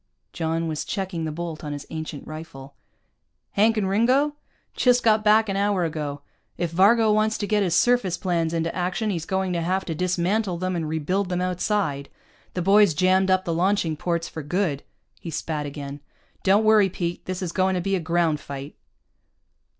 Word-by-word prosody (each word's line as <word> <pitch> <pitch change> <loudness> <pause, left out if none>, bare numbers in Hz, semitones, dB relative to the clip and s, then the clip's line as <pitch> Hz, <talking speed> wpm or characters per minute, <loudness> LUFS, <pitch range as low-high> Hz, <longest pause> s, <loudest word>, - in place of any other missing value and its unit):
John 165 0 -1
was 155 -2 -3
checking 185 -4 -3
the 155 - -3
bolt 165 0 -6
on 150 -1 -4
his 145 -1 -7
ancient 155 -2 -6
rifle. 155 -3 -9 0.8
"Hank 220 +2 +3
and 200 -3 +1
Ringo? 255 +9 +2 0.4
Just 250 -1 +3
got 215 -1 +4
back 215 +1 +5
an 195 - -2
hour 200 -2 +1
ago. 150 -3 -4 0.3
If 175 -2 -2
Varga 215 +5 +4
wants 215 +1 +2
to 205 - -2
get 210 0 +1
his 175 -4 +1
surface 230 -7 +2
planes 170 -3 0
into 165 0 -1
action, 185 +4 -1
he's 165 -4 -4
going 190 -1 -1
to 170 - -1
have 185 +3 -1
to 165 - -3
dismantle 180 +3 0
them 185 +1 -2
and 160 -3 -2
rebuild 180 +5 -1
them 180 -1 -1
outside. 180 -5 -1 0.5
The 180 - -1
boys 200 -3 +5
jammed 185 +2 +3
up 185 0 +2
the 170 - -1
launching 175 -2 +1
ports 170 +1 -2
for 160 - -7
good." 155 -1 -1 0.4
He 170 - -7
spat 155 -2 -3
again. 140 0 -7 0.4
"Don't 200 +3 +3
worry, 215 -3 +5
Pete. 175 -1 -4
This 185 0 -4
is 175 - -3
going 190 +1 +1
to - - 0
be 195 +2 0
a - - 0
ground 165 -2 +1
fight." 140 0 -8
180 Hz, 190 wpm, -24 LUFS, 160-200 Hz, 0.8 s, back